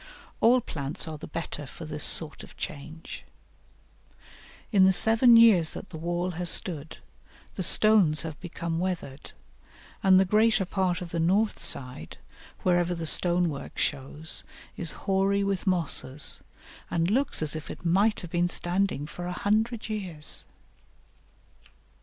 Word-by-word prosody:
All 245 +2 +4
plants 145 -5 -4
are 155 -1 -7
the - - -9
better 150 -2 -6
for 165 - -11
this 150 -1 -2
sort 155 -2 +4
of - - -15
change. 155 +3 -8 1.5
In 200 -4 +4
the 190 - +5
seven 225 +5 +6
years 205 -9 +5
that - - -9
the - - -8
wall 175 +2 -3
has 175 0 -1
stood, 160 -4 0 0.6
the - - -6
stones 185 -4 +5
have 160 -2 -8
become 170 -2 -5
weathered, 170 -6 -5 0.7
and 190 -3 +5
the 190 - +3
greater 215 0 +2
part 185 -2 -2
of 175 -2 -8
the 170 - -3
north 195 +6 +1
side, 125 - 0 0.5
wherever 175 -1 +1
the 165 -1 -6
stone 175 +2 +3
work 140 -4 -7
shows, 145 +3 -3 0.3
is 170 - -1
hoary 195 0 +1
with 195 -1 -3
mosses, 160 -6 0 0.5
and 170 +2 -1
looks 260 - 0
as 155 0 0
if 155 - -8
it - - -10
might 200 +6 +1
have 175 -3 -10
been 175 0 0
standing 175 -3 -1
for 175 +3 -8
a - - -4
hundred 215 +5 -1
years. 185 -8 -2
175 Hz, 145 wpm, -26 LUFS, 160-195 Hz, 1.5 s, seven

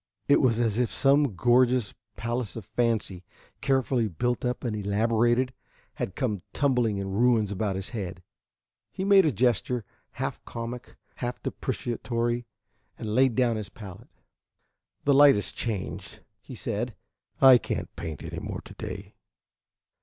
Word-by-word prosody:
It 145 - +5
was 120 -4 +3
as 115 -1 +1
if 125 - +2
some 140 -5 +3
gorgeous 120 +1 +3 0.2
palace 120 -1 -3
of 115 -5 -7
fancy, 110 -6 -1 0.4
carefully 130 -4 +1
built 120 +6 -1
up 125 0 -2
and 115 -4 -1
elaborated, 115 +5 +1 0.4
had 95 - -4
come 105 -8 -1
tumbling 125 -7 +2
in 100 0 -3
ruins 110 -1 +3
about 100 0 -1
his 95 +2 -4
head. 95 -6 -5 0.7
He 190 - -4
made 195 -2 +6
a - - +3
gesture, 120 0 +1 0.3
half - - -4
comic, 115 +1 -7 0.2
half 120 0 -3
deprecatory, 120 -1 -2 0.5
and 110 -3 -4
laid 130 0 +4
down 120 -3 +2
his 105 -3 -5
palette. 100 -5 -11 0.9
"The 145 - +4
light 140 0 +8
has 105 - -2
changed," 110 -6 -4 0.2
he - - -10
said. 115 +3 -3 0.4
"I 130 -2 +9
can't - - -4
paint 80 -3 -6
any - - -5
more - - -5
to - - -12
day." - - -7
120 Hz, 145 wpm, -27 LUFS, 105-125 Hz, 0.9 s, I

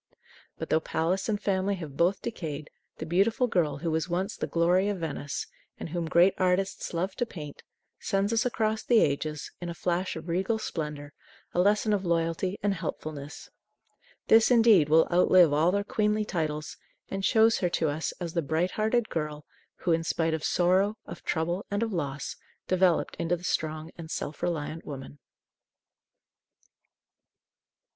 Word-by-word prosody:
But, - - -5
though 160 - +4
palace 175 +6 -1
and 210 -1 0
family 195 0 0
have 155 -7 -8
both 175 +6 +1
decayed, 155 -9 -5 0.3
the 160 - -5
beautiful 200 +9 +2
girl 165 - 0
who 165 +2 -2
was 160 +2 -1
once 185 +4 -1
the - - -3
glory 180 +4 +2
of 205 - -1
Venice 145 -4 -4 0.3
and - - -5
whom 170 0 -3
great 175 +4 +5
artists 185 +1 0
loved 185 +3 -3
to 240 - +2
paint, 150 -8 -9 0.4
sends 200 +3 0
us 230 +1 +2
across 220 -3 0
the 235 -2 +4
ages, 150 0 -1
in 175 - -4
a 170 - -5
flash 180 +2 -1
of 160 +1 -8
regal 190 +6 0
splendor, 150 -7 -5 0.4
a - - 0
lesson 210 +3 +3
of 200 -2 0
loyalty 170 +2 0
and 205 -1 +2
helpfulness. 155 -4 -6 0.8
This, 225 0 +6
indeed, 225 - +6
will 160 +1 +5
outlive 180 -3 +6
all 160 +4 +3
their 200 +1 0
queenly 210 +1 0
titles, 155 -5 -3 0.3
and 195 0 -4
shows 225 +2 +4
her 180 - +1
to 165 -2 0
us 155 +2 -2
as 170 -2 -4
the 170 - +1
bright 160 +5 0
hearted 220 +2 +1
girl 150 -2 -4 0.4
who, 175 - +1
in 165 0 +2
spite 165 0 0
of 160 -1 -2
sorrow, 190 +4 +2
of 170 - -9
trouble, 170 +4 -1
and 205 +2 0
of 225 -2 -2
loss, 140 -5 -3 0.3
developed 185 -2 +2
into 170 +1 0
the 175 - -15
strong 155 -1 -2
and 160 -1 -8
self 150 -2 -5
reliant 165 -1 -2
woman. 140 0 -8
175 Hz, 165 wpm, -28 LUFS, 160-195 Hz, 0.8 s, This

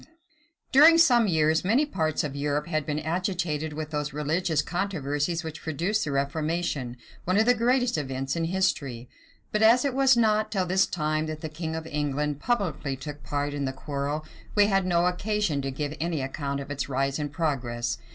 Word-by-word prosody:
} - - -36 0.3
During 310 +5 +8
some 240 -9 +5
years, 160 -2 +2
many 235 +11 +3
parts 160 - -1
of 145 -2 -4
Europe 145 +1 -1
had 155 -3 -2
been 150 -1 -1
agitated 160 -2 -2
with 155 0 -5
those 150 -1 -2
religious 155 +2 0
controversies 170 -3 -2
which 160 -1 -7
produced 175 +8 -1
the 145 - -3
reformation, 140 -2 -2 0.3
one 185 +2 +1
of 220 - +4
the 245 - +5
greatest 245 -3 +1
events 135 0 -3
in 165 -1 -1
history: 140 -9 -1 0.4
but 210 - 0
as 235 +4 +6
it 275 - 0
was 265 -1 +4
not 215 -1 +2
till 190 -3 0
this 190 +2 +2
time 155 -1 -1
that 155 0 -5
the 155 - -4
king 160 +1 -4
of 160 0 -5
England 150 -1 -2
publicly 165 - -1
took 145 +2 -8
part 145 0 -2
in 145 -1 -2
the 130 - -1
quarrel, 145 +2 -3 0.3
we 205 -1 +6
had 195 -2 +1
no 175 -1 +2
occasion 180 -4 0
to 135 - -3
give 145 +2 -4
any 160 -3 -1
account 140 +1 -3
of 140 +1 -7
its 135 -2 -3
rise 135 +2 0
and 145 -1 -3
progress. 125 -7 -2
155 Hz, 190 wpm, -26 LUFS, 145-190 Hz, 0.4 s, During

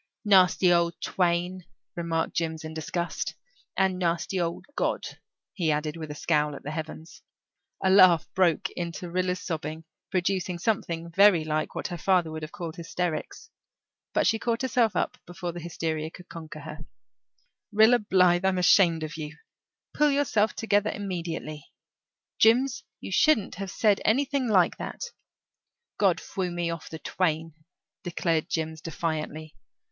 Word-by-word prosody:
"Nasty 185 -2 +5
old 170 -1 +1
twain," 180 0 0 0.3
remarked 165 -1 -1
Jims 160 -1 -2
in 155 0 -6
disgust. 170 +2 -3 0.4
"And 190 -1 +2
nasty 175 +1 0
old 170 0 -3
God," - - 0 0.5
he 170 -5 0
added, 150 +1 -1
with 160 -2 -7
a 150 - -6
scowl 150 -1 +1
at - - -10
the 145 - -5
heavens. 160 +1 -7 0.6
A 190 - +4
laugh 185 -4 +6
broke 185 +1 +2
into 170 0 -5
Rilla's 180 0 0
sobbing, 155 -1 -4 0.3
producing 185 -1 -1
something 170 -4 -2
very 195 -2 +6
like 155 0 -2
what - - -3
her 175 -2 -5
father 180 -2 +2
would 155 0 -6
have 155 0 -7
called 165 -1 -6
hysterics. 170 -1 -4 0.6
But - - +1
she 225 - +2
caught 235 +1 -1
herself 240 -4 +2
up - - -1
before 175 0 -5
the 175 - -7
hysteria 160 -2 -3
could 180 +2 -14
conquer 155 -2 -9
her. 155 +1 -8 0.9
"Rilla 220 +4 +6
Blythe, 180 -3 +3
I'm 190 -1 +2
ashamed 175 -3 +4
of 155 +1 -5
you. 155 0 -7 0.6
Pull 300 0 +3
yourself 275 -7 +1
together 210 -1 +1
immediately. 165 -7 -5 0.7
Jims, 260 +4 +4 0.2
you - - -7
shouldn't 245 0 +3
have 195 - -4
said 205 +1 +2
anything 275 +2 +1
like 185 -6 +3
that." - - -6 1.0
"God - - +3
frew 185 -3 -3
me 175 -1 -2
off 165 - -7
the 160 - -6
twain," 165 -1 -1 0.5
declared 170 -3 -1
Jims 160 -1 -3
defiantly. 155 -1 -4
175 Hz, 150 wpm, -27 LUFS, 160-190 Hz, 1.0 s, laugh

